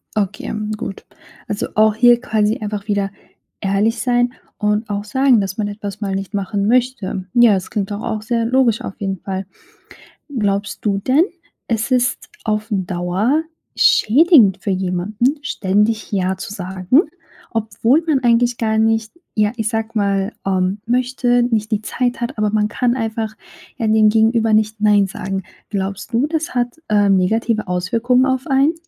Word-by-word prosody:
Okay, 200 Hz, -3 st, -2 dB, 0.3 s
gut. 195 Hz, -, -7 dB, 0.4 s
Also, 205 Hz, -, -2 dB
auch 215 Hz, 0 st, +4 dB
hier 240 Hz, +1 st, +5 dB
quasi 215 Hz, -3 st, 0 dB
einfach 210 Hz, 0 st, -5 dB
wieder 200 Hz, -1 st, 0 dB, 0.5 s
ehrlich 205 Hz, +4 st, +1 dB
sein 245 Hz, +1 st, +1 dB, 0.2 s
und 210 Hz, +1 st, 0 dB
auch 205 Hz, 0 st, -2 dB
sagen, 260 Hz, +3 st, +3 dB
dass 195 Hz, 0 st, -3 dB
man 210 Hz, -1 st, -1 dB
etwas 205 Hz, 0 st, -7 dB
mal 195 Hz, -2 st, -2 dB
nicht 195 Hz, +1 st, -5 dB
machen 200 Hz, +1 st, -1 dB
möchte. 240 Hz, -6 st, 0 dB
Ja, 240 Hz, -3 st, +6 dB
das 190 Hz, -2 st, -2 dB
klingt 200 Hz, -1 st, -3 dB
doch 205 Hz, +1 st, -4 dB
auch 220 Hz, -2 st, -3 dB
sehr 230 Hz, 0 st, -1 dB
logisch 245 Hz, -2 st, +2 dB
auf -, -, -7 dB
jeden 195 Hz, -2 st, -3 dB
Fall. 190 Hz, -1 st, -4 dB, 0.9 s
Glaubst 200 Hz, -1 st, -1 dB
du 200 Hz, -2 st, +1 dB
denn, 270 Hz, -, +3 dB, 0.4 s
es 225 Hz, +1 st, -1 dB
ist 250 Hz, 0 st, +1 dB, 0.2 s
auf 215 Hz, -1 st, -1 dB
Dauer 190 Hz, -, 0 dB, 0.3 s
schädigend 245 Hz, -, +5 dB
für 200 Hz, -, -2 dB
jemanden, 195 Hz, -, -1 dB
ständig 210 Hz, 0 st, 0 dB
„ja“ 190 Hz, -1 st, 0 dB
zu 190 Hz, -, -7 dB
sagen, 190 Hz, -, +1 dB, 0.5 s
obwohl 225 Hz, +6 st, +1 dB
man 295 Hz, -4 st, +3 dB
eigentlich 240 Hz, 0 st, +2 dB
gar 220 Hz, -1 st, 0 dB
nicht, 225 Hz, 0 st, +1 dB, 0.2 s
ja, 210 Hz, 0 st, +2 dB
ich 220 Hz, -1 st, -1 dB
sage 225 Hz, -1 st, -2 dB
mal, 200 Hz, 0 st, 0 dB
ähm, 185 Hz, +1 st, 0 dB
möchte, 245 Hz, 0 st, +1 dB
nicht 220 Hz, -2 st, -1 dB
die 210 Hz, -, +1 dB
Zeit 245 Hz, +2 st, -2 dB
hat, 240 Hz, +2 st, -3 dB
aber 210 Hz, -1 st, +1 dB
man 210 Hz, 0 st, +1 dB
kann 245 Hz, +3 st, 0 dB
einfach, 220 Hz, -1 st, -3 dB, 0.4 s
ja, 230 Hz, -, -1 dB
dem 215 Hz, -1 st, +4 dB
Gegenüber 225 Hz, 0 st, +2 dB
nicht 215 Hz, 0 st, +1 dB
„nein“ 205 Hz, -2 st, +4 dB
sagen. 190 Hz, 0 st, -5 dB, 0.3 s
Glaubst 195 Hz, +2 st, -4 dB
du, 240 Hz, +5 st, +2 dB
das 320 Hz, +2 st, -3 dB
hat, 245 Hz, +5 st, -2 dB
äh 205 Hz, -1 st, +3 dB
negative 215 Hz, +4 st, +1 dB
Auswirkungen 235 Hz, +8 st, +1 dB
auf 260 Hz, +1 st, -1 dB
einen? 275 Hz, +3 st, +3 dB
215 Hz, 160 wpm, -19 LUFS, 200-240 Hz, 0.9 s, Ja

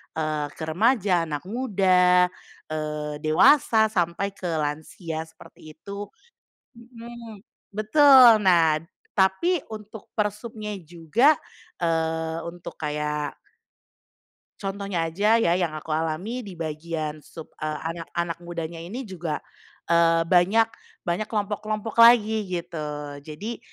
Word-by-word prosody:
eee, 155 Hz, -2 st, -1 dB
ke 160 Hz, -, -7 dB
remaja, 195 Hz, -2 st, +2 dB
anak 150 Hz, -3 st, -4 dB
muda, 185 Hz, -6 st, +3 dB, 0.4 s
eee, 150 Hz, -1 st, -3 dB
dewasa, 220 Hz, -, +5 dB
sampai 175 Hz, +2 st, 0 dB
ke 185 Hz, -, -9 dB
lansia 155 Hz, +2 st, -4 dB
seperti 155 Hz, -1 st, -15 dB
itu 200 Hz, +5 st, -7 dB, 0.7 s
mhm, 235 Hz, -3 st, -11 dB, 0.3 s
betul. 245 Hz, +1 st, +7 dB
Nah, 165 Hz, -5 st, +4 dB, 0.4 s
tapi 245 Hz, -, +3 dB
untuk 215 Hz, 0 st, -9 dB
persubnya 210 Hz, +1 st, -3 dB
juga, 175 Hz, -, +2 dB, 0.5 s
eee, 160 Hz, 0 st, 0 dB
untuk 175 Hz, 0 st, -9 dB
kayak 150 Hz, -1 st, -2 dB, 1.2 s
contohnya 195 Hz, -3 st, -3 dB
aja 210 Hz, +6 st, +3 dB
ya 225 Hz, -7 st, +3 dB
yang 165 Hz, -4 st, -1 dB
aku 155 Hz, +1 st, -7 dB
alami 165 Hz, +9 st, -2 dB
di 200 Hz, -7 st, -8 dB
bagian 155 Hz, -1 st, -4 dB
sub, 155 Hz, +1 st, -12 dB
eee, 155 Hz, 0 st, -3 dB
anak-anak 170 Hz, 0 st, -4 dB
mudanya 170 Hz, -1 st, -6 dB
ini 205 Hz, +11 st, -6 dB
juga, 175 Hz, -8 st, -5 dB, 0.5 s
eee, 165 Hz, 0 st, +4 dB
banyak 185 Hz, +6 st, +4 dB, 0.4 s
banyak 175 Hz, +5 st, -2 dB
kelompok-kelompok 215 Hz, +1 st, -3 dB
lagi 220 Hz, -3 st, +6 dB
gitu. 150 Hz, -5 st, -5 dB
Jadi, 160 Hz, +11 st, -7 dB
175 Hz, 110 wpm, -25 LUFS, 160-215 Hz, 1.2 s, betul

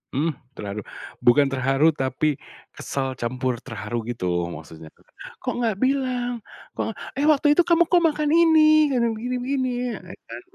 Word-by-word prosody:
Mmm, 155 Hz, +4 st, +1 dB, 0.2 s
terharu, 100 Hz, 0 st, -5 dB, 0.4 s
bukan 135 Hz, +3 st, +4 dB
terharu 135 Hz, +4 st, +2 dB
tapi 140 Hz, 0 st, -1 dB, 0.3 s
kesel 135 Hz, -1 st, -4 dB
campur 125 Hz, +1 st, -2 dB
terharu 110 Hz, -1 st, -5 dB
gitu 90 Hz, -7 st, -2 dB
maksudnya, 80 Hz, +1 st, -11 dB, 0.6 s
"Kok -, -, -1 dB
nggak 230 Hz, -4 st, 0 dB
bilang," 255 Hz, -3 st, 0 dB, 0.3 s
"Kok, 225 Hz, -, -4 dB, 0.2 s
eh, 290 Hz, -, +2 dB
waktu 295 Hz, -1 st, +4 dB
itu 340 Hz, +3 st, +3 dB
kamu 345 Hz, 0 st, +5 dB
kok 355 Hz, -, +6 dB
makan 300 Hz, -1 st, -1 dB
ini 310 Hz, -2 st, +5 dB
kadang 240 Hz, -4 st, +1 dB
begini-begini." 255 Hz, +2 st, -2 dB, 0.3 s
Ah, -, -, -16 dB
itu -, -, -48 dB
kan, -, -, -7 dB
215 Hz, 150 wpm, -23 LUFS, -, 0.6 s, kok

